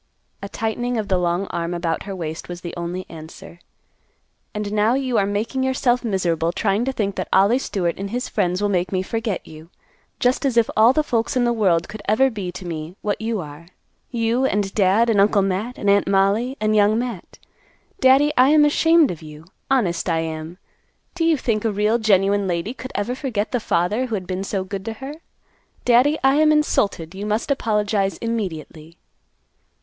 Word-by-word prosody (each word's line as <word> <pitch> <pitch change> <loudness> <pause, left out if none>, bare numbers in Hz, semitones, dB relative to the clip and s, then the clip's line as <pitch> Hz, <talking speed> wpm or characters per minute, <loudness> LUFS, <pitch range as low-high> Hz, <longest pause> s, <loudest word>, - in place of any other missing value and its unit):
A 200 - -6
tightening 240 +3 -2
of 215 -2 -3
the 185 -2 +2
long 175 +2 0
arm 170 +1 -3
about 170 0 -2
her 195 - -4
waist 160 -2 -6
was 175 0 -7
the 170 -2 -7
only 175 +2 -4
answer. 165 +1 -11 0.9
"And 210 -1 -4
now 215 +3 +2
you 260 -3 0
are 195 - +1
making 215 +6 -2
yourself 260 -1 +1
miserable 170 -6 0
trying 205 +4 0
to 270 - 0
think 205 -6 -2
that - - -3
Ollie 200 +7 +4
Stewart 180 -9 -2
and 195 0 -4
his 245 +4 -3
friends 180 +2 -1
will 205 - +2
make 180 -2 0
me 185 -1 0
forget 225 -1 -3
you; 155 +1 -13 0.5
just 250 +3 +1
as 265 -4 0
if 230 - +3
all 225 +3 +6
the 310 +3 +1
folks 235 -2 -1
in 250 - +2
the 240 0 +2
world 180 -7 +1
could 210 0 -9
ever 265 +5 +3
be 195 -5 -5
to 180 +1 -9
me 165 0 -6
what 210 +1 -2
you 220 -2 -2
are; 150 +1 -11 0.4
you, 235 +1 0
and 205 -6 0
Dad, 205 +3 +3
and 215 -4 +3
Uncle 200 0 +3
Matt, 195 +6 -2
and 205 - -4
Aunt 200 0 +3
Mollie, 200 +7 +1
and 215 0 +1
Young 210 +1 +4
Matt. 235 -6 -5 0.6
Daddy, 275 +2 +5
I 255 +2 +5
am 300 0 +6
ashamed 325 0 +4
of 170 - -8
you. 155 0 -12 0.2
Honest, 195 -10 +1
I 165 -1 +1
am. 160 +1 -6 0.6
Do 355 - -2
you 330 -2 +3
think 225 -5 -1
a 225 - +1
real 210 +3 +1
genuine 200 -2 +2
lady 175 +6 -2
could 255 0 -9
ever 205 +5 -1
forget 245 -6 -3
the 245 - 0
father 210 +5 0
who 225 - -2
had 190 -3 -4
been 185 +1 -3
so 195 -1 -2
good 195 0 -6
to 225 - -3
her? 270 +6 -8 0.7
Daddy, 250 +5 +4
I 270 +1 +4
am 310 0 +5
insulted. 200 - +1
You 200 +2 -5
must 215 +6 -1
apologize 210 -7 0
immediately." 170 -7 -5
205 Hz, 200 wpm, -21 LUFS, 180-240 Hz, 0.9 s, all